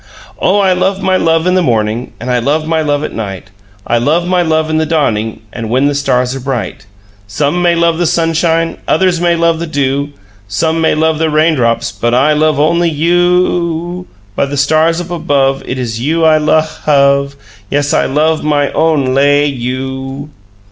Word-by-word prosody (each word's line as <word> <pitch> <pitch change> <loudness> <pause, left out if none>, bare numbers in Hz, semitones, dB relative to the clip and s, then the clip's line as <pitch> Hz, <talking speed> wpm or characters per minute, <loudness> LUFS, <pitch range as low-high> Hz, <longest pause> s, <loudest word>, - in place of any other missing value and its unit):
"Oh, 195 - +2
I 195 -2 +3
love 190 +2 -1
my 190 0 +2
love 165 -2 +1
in 180 - +2
the 185 - +2
morning 115 -4 -1
And 125 +2 -4
I 125 - +1
love 145 +6 0
my 160 0 0
love 145 -1 -1
at - - -5
night, 95 -3 -6 0.3
I 120 - +1
love 160 +8 0
my 180 0 +2
love 160 -2 0
in 155 - 0
the 160 - 0
dawning, 115 -10 -1
And 115 -2 -5
when 130 +4 +1
the 145 - +1
stars 125 -2 0
are - - -5
bright. 125 -5 -5 0.4
Some 145 - -1
may 175 -1 +3
love 170 -1 +1
the 175 - +1
sunshine, 165 0 0
Others 175 +1 +1
may 175 -1 +2
love 165 -1 +1
the 170 - -4
dew. 140 -1 -1 0.4
Some 160 +12 -1
may 160 - +2
love 160 0 0
the 160 -1 +1
raindrops, 150 -7 +1
But 120 +1 -1
I 145 +4 +3
love 155 -1 +1
only 170 +3 +2
you 165 +3 0 0.3
OO 175 0 -3
oo! 180 - -12 0.3
By 140 - 0
the 140 +1 -4
stars 155 +4 +2
up 175 0 -7
above 140 -5 0
It 130 - -3
is 115 -3 -4
you 160 +5 +1
I 155 -1 +4
luh 155 +1 +2
HUV! 140 -2 +1 0.3
Yes, 145 0 0
I - - +2
love 155 +3 0
own 145 -1 +1
LAY 145 +2 +3
you!" 135 +2 -5
150 Hz, 195 wpm, -13 LUFS, 135-165 Hz, 0.4 s, I